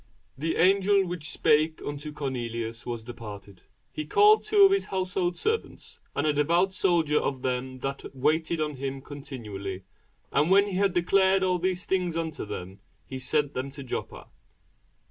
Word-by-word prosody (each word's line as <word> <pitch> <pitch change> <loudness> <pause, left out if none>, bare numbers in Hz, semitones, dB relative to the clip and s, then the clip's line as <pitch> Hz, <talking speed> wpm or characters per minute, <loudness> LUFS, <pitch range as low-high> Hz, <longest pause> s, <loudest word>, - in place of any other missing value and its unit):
And - - -16
when 165 - -1
the - - -2
angel 195 +2 +4
which 170 -4 -4
spake 155 +1 +2
unto 145 +1 -5
Cornelius 115 -5 -4
was 120 -2 -4
departed, 105 -5 -10 0.3
he 155 - -4
called 420 - +5
two 410 -2 +6
of 390 - +5
his 390 0 +2
household 185 -2 -1
servants, 445 +1 -3 0.2
and 145 - 0
a 150 - +3
devout 170 +6 +2
soldier 170 -6 +2
of 130 -2 -3
them 130 0 -2
that 135 +1 -4
waited 160 +5 +1
on 150 -2 -2
him 135 0 -4
continually; 105 -10 -7 0.5
and 150 - +2
when 200 +2 +6
he 200 - -5
had 195 -1 +2
declared 190 +2 +3
all 180 -1 +1
these 185 0 -1
things 180 -3 0
unto 160 -6 -3
them, 95 0 -7 0.3
he 130 - -6
sent 145 +2 +1
them 130 +2 -3
to 140 0 -9
Joppa. 125 - -5
150 Hz, 170 wpm, -27 LUFS, 130-185 Hz, 0.5 s, two